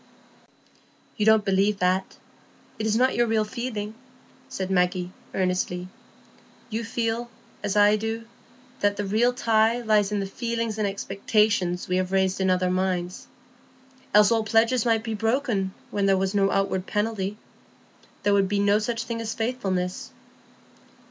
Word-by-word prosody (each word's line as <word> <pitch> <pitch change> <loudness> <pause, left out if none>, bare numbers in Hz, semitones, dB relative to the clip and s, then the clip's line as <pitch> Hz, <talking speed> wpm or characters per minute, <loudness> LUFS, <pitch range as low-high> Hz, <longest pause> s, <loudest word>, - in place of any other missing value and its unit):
"You 210 -3 0
don't 220 -1 +5
believe 195 +1 +2
that; 185 0 0 0.6
it 220 - -1
is 215 - +1
not 255 +3 +3
your 240 0 +2
real 220 -1 +1
feeling," 220 -2 -4 0.6
said 190 0 -4
Maggie, 180 -1 +1 0.2
earnestly. 180 -1 -1 0.8
"You 225 +2 -2
feel, 230 +1 -2 0.3
as 200 - -2
I 205 +1 +5
do, 225 +1 -4 0.5
that 205 0 +1
the 205 - -2
real 220 +5 +2
tie 230 -2 +2
lies 210 -2 +2
in 205 - 0
the 195 - -2
feelings 230 +1 -3
and 210 - +1
expectations 200 -2 0
we 180 - 0
have 185 0 -1
raised 190 0 +1
in 190 - +2
other 185 0 +2
minds. 185 -1 -2 0.9
Else 210 +1 +7
all 225 -1 +2
pledges 225 +2 +2
might 225 -1 +2
be 225 -1 -3
broken, 225 -3 0 0.2
when 200 -1 0
there 195 -1 +4
was 190 +1 -1
no 195 -1 +3
outward 195 -1 0
penalty. 210 -1 -2 0.9
There 205 0 +3
would 195 -1 +3
be 205 - 0
no 200 +1 +3
such 230 +1 -2
thing 230 0 -4
as 225 -1 -4
faithfulness." 195 -6 -2
205 Hz, 155 wpm, -25 LUFS, 190-225 Hz, 0.9 s, Else